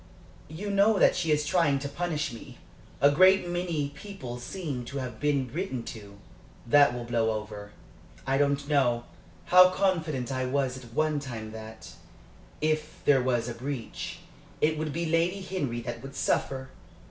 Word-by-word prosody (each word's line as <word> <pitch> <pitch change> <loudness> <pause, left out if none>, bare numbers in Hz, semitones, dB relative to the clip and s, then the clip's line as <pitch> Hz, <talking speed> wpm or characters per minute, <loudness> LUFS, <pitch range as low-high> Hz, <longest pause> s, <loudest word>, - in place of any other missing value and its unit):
"You 185 +7 -5
know 200 +2 +4
that - - +5
she 165 -3 0
is 150 0 +2
trying 155 -3 +3
to 140 +1 -4
punish 155 -2 -2
me. 115 - -11 0.4
A 140 - +6
great 185 +4 +5
many 175 -5 -1
people 140 -6 -8
seem 140 -1 -5
to 140 +3 -6
have 125 -4 -5
been 140 -4 0
written 165 -9 -3
to." 100 -3 -12 0.5
"That 140 +1 +5
will 120 - -4
blow 115 -1 +1
over." 105 -1 -9 0.5
"I 135 +1 +1
don't 140 0 +1
know. 125 -5 +2 0.4
How 185 0 +8
confident 165 -9 0
I 130 -1 -1
was 130 -1 0
at 125 -3 -11
one 155 -1 +1
time 115 -6 -6
that, 110 0 -9 0.7
if 155 0 -1
there 135 -3 +5
was 125 -2 0
a 120 - -3
breach, 125 0 -5 0.4
it 155 +1 +2
would 155 0 -3
be 170 +4 -2
Lady 165 +4 +1
Henry 145 -11 -3
that 115 -1 -6
would 135 +1 -9
suffer! 130 -1 -1
140 Hz, 165 wpm, -28 LUFS, 120-165 Hz, 0.7 s, How